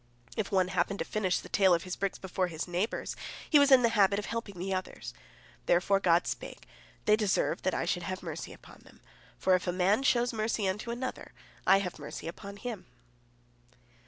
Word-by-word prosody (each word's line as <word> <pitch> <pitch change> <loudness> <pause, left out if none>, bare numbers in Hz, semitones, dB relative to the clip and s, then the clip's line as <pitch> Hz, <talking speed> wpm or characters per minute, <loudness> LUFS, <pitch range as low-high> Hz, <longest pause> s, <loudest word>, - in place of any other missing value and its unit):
If 215 - -2
one 185 -2 +2
happened 185 +2 0
to - - -3
finish 190 -4 0
the - - -7
tale 190 -3 +4
of 170 - -3
his 185 -1 -4
bricks 200 -1 -2
before 185 -1 -2
his 165 -1 -5
neighbors, 180 +5 -2 0.3
he 300 - +6
was 285 0 +5
in 260 -2 +8
the 235 - +5
habit 200 -3 +3
of 210 - -3
helping 230 -5 -5
the 190 +2 -2
others. 185 0 -5 0.5
Therefore 195 +3 +3
God 175 -2 +3
spake, - - -6 0.4
"They 210 - +6
deserve 210 -3 0
that 185 - 0
I - - -1
should 175 - 0
have 185 +2 -5
mercy - - -6
upon - - -14
them, - - -19 0.4
for 190 - +2
if 185 0 +1
a - - +2
man 185 +6 +2
shows 245 -3 +2
mercy 215 -2 0
unto 210 +5 -3
another, 250 +2 -5 0.3
I 195 - +7
have 180 - -6
mercy 145 +2 -7
upon 200 +4 -8
him." 215 -5 -6
195 Hz, 200 wpm, -30 LUFS, 180-215 Hz, 0.5 s, in